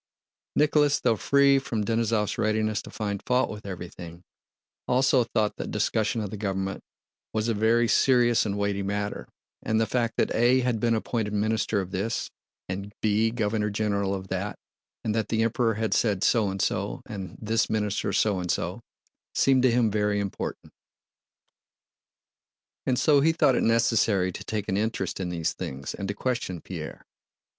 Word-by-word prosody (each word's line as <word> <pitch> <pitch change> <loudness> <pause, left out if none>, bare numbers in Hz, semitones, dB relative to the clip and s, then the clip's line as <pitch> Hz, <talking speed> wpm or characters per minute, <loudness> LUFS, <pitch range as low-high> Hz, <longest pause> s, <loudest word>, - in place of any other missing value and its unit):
Nicholas, 150 -1 +3
though 115 -3 +2
free 140 +4 +4
from 115 -5 -2
Denísov's 115 -1 0
readiness 110 0 +1
to - - -11
find 100 -2 -3
fault 125 +1 +1
with 105 -1 -8
everything, 85 -2 -8 0.6
also 130 0 +3
thought 110 -2 -1
that - - -5
discussion 110 +1 0
of 105 -2 -4
the 105 - -5
government 95 -1 -3 0.5
was 110 0 0
a 115 - +1
very 115 +3 +3
serious 120 -2 +4
and 100 -2 -2
weighty 100 -1 0
matter, 100 +1 -3 0.3
and 110 0 0
the 115 - +3
fact 115 +1 -1
that - - +1
A 125 +3 +4
had 120 -3 0
been 115 +1 +2
appointed 110 -1 -2
Minister 110 0 +1
of 95 0 -7
This 105 +5 -2 0.4
and 100 +2 -5
B 110 +1 +3
Governor 110 -2 -1
General 100 -1 0
of 95 -1 -7
That, 95 +2 -3 0.5
and 110 - 0
that 110 -1 0
the 115 0 +1
Emperor 115 0 +1
had 110 0 -1
said 100 -4 +1
so 110 -4 +3
and 95 0 -4
so - - -1
and 95 -3 -7
this 110 +1 0
minister 105 -1 -1
so 100 -1 +2
and 90 -1 -4
so, - - -2 0.5
seemed 135 -1 +4
to 130 -1 +4
him 115 -2 +2
very 105 0 +1
important. 100 -1 -5 2.1
And 130 -2 +2
so 145 0 +4
he 160 +3 +4
thought 150 -5 +4
it - - +1
necessary 115 -5 +2
to - - -8
take 105 -2 -3
an 95 - 0
interest 105 -4 -2
in 90 -2 -2
these 85 -2 -1
things 70 0 -6
and 100 - -5
to 100 - -3
question 120 -8 -2
Pierre. - - -8
110 Hz, 170 wpm, -26 LUFS, 100-115 Hz, 2.1 s, free